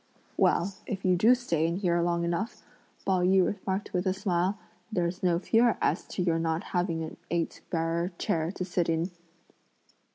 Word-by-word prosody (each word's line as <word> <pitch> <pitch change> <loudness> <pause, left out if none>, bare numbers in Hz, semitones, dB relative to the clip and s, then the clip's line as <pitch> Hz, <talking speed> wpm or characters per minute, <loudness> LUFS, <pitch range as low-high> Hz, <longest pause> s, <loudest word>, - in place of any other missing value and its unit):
"Well, 190 +3 +2
if 195 -2 -4
you 185 -1 +4
do 225 +8 +6
stay 170 -10 0
in 170 - -1
here 175 -3 +1
long 170 0 +1
enough," 175 +7 -2 0.4
Pao 190 -2 +2
yü 185 +1 +4
remarked 195 0 -3
with 180 +1 0
a 185 - +1
smile, 190 0 0 0.3
"there's 180 -2 -1
no 175 -2 +3
fear 230 +5 +3
as - - 0
to 180 - -2
your 165 -2 +1
not 165 +1 -1
having 175 -3 0
an 160 - -7
eight 170 -1 -2
bearer 170 +2 0
chair 160 +1 0
to 185 - -3
sit 175 -2 0
in!" 165 +3 0
180 Hz, 175 wpm, -28 LUFS, 170-190 Hz, 0.4 s, do